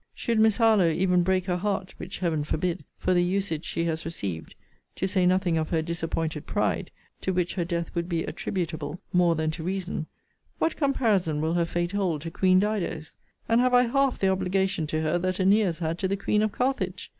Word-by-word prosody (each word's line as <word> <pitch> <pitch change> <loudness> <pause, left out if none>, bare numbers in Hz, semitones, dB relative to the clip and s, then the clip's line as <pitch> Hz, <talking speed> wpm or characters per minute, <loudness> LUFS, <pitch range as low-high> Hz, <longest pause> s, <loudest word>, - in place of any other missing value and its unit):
Should 230 -2 0
Miss 220 -2 +4
Harlowe 220 -7 +5
even 180 +2 +2
break 185 0 +1
her 180 -2 0
heart, 190 0 -2
(which 185 +2 -7
Heaven 165 -5 0
forbid!) 170 +4 -2
for 185 - +1
the 175 -1 +3
usage 180 -3 -1
she 165 - -2
has 165 -1 -1
received, 100 - -5 0.4
(to 190 - -1
say 185 -2 +2
nothing 180 -3 +2
of 155 - -2
her 160 -2 +1
disappointed 165 -2 -3
pride, - - 0 0.3
to 190 - -1
which 180 -1 0
her 180 - -1
death 170 -1 -3
would 170 +1 -2
be 165 -2 0
attributable, 160 -3 -4
more 175 -2 +4
than 155 0 0
to 160 - -7
reason,) 185 -3 -3 0.5
what 325 - 0
comparison 215 - +1
will 160 +2 0
her 170 -1 +2
fate 175 +1 -2
hold 185 -7 -1
to 165 - -5
Queen 185 +1 +4
Dido's? 190 -6 -2 0.3
And 230 +1 +4
have 250 0 +3
I 245 - +6
half 270 +2 +1
the 195 - +2
obligation 190 -3 0
to 155 +1 -1
her, 155 +3 +1
that 185 +1 -1
Æneas 190 -2 +3
had 165 +1 -2
to 190 - 0
the 195 +1 -1
Queen 210 +1 +1
of 215 -1 +1
Carthage? 205 -6 -2
180 Hz, 205 wpm, -26 LUFS, 165-195 Hz, 0.5 s, I